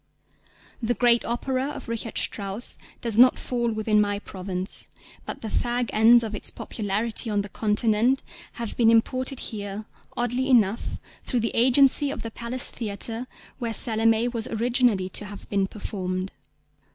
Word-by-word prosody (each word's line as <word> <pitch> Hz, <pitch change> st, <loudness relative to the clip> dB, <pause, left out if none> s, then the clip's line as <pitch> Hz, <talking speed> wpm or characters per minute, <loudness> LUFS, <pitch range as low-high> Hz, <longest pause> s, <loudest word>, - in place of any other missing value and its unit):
The 240 Hz, +1 st, 0 dB
great 240 Hz, -1 st, +4 dB
opera 260 Hz, +3 st, -2 dB
of 295 Hz, -, -8 dB
Richard 230 Hz, 0 st, -4 dB
Strauss 200 Hz, +3 st, -2 dB, 0.3 s
does 230 Hz, -2 st, +1 dB
not 255 Hz, +1 st, +7 dB
fall 240 Hz, -2 st, -2 dB
within 215 Hz, -1 st, +2 dB
my 205 Hz, -1 st, 0 dB
province; 185 Hz, -1 st, -3 dB, 0.4 s
but -, -, -6 dB
the 225 Hz, -, -5 dB
fag 240 Hz, +2 st, -1 dB
ends 230 Hz, +2 st, +6 dB
of 220 Hz, -1 st, -4 dB
its 210 Hz, -, 0 dB
popularity 220 Hz, +2 st, -2 dB
on 205 Hz, -1 st, 0 dB
the 205 Hz, -, -9 dB
Continent 220 Hz, +5 st, +1 dB, 0.3 s
have 235 Hz, -2 st, -5 dB
been 230 Hz, -2 st, +4 dB
imported 255 Hz, +3 st, +1 dB
here 205 Hz, -1 st, -5 dB, 0.3 s
oddly 245 Hz, +2 st, 0 dB
enough 225 Hz, -4 st, +2 dB, 0.3 s
through 245 Hz, -3 st, -1 dB
the 230 Hz, -, -2 dB
agency 265 Hz, +4 st, +5 dB
of -, -, -5 dB
the 230 Hz, -, -5 dB
Palace 235 Hz, +3 st, -1 dB
Theatre, 225 Hz, +2 st, -1 dB, 0.3 s
where 235 Hz, -3 st, -3 dB
Salomé 225 Hz, +1 st, +2 dB
was 230 Hz, -1 st, -2 dB
originally 235 Hz, -4 st, +1 dB
to 210 Hz, -, -1 dB
have 205 Hz, 0 st, -10 dB
been 195 Hz, -1 st, +1 dB
performed. 185 Hz, -2 st, -4 dB
225 Hz, 150 wpm, -25 LUFS, 210-245 Hz, 0.4 s, not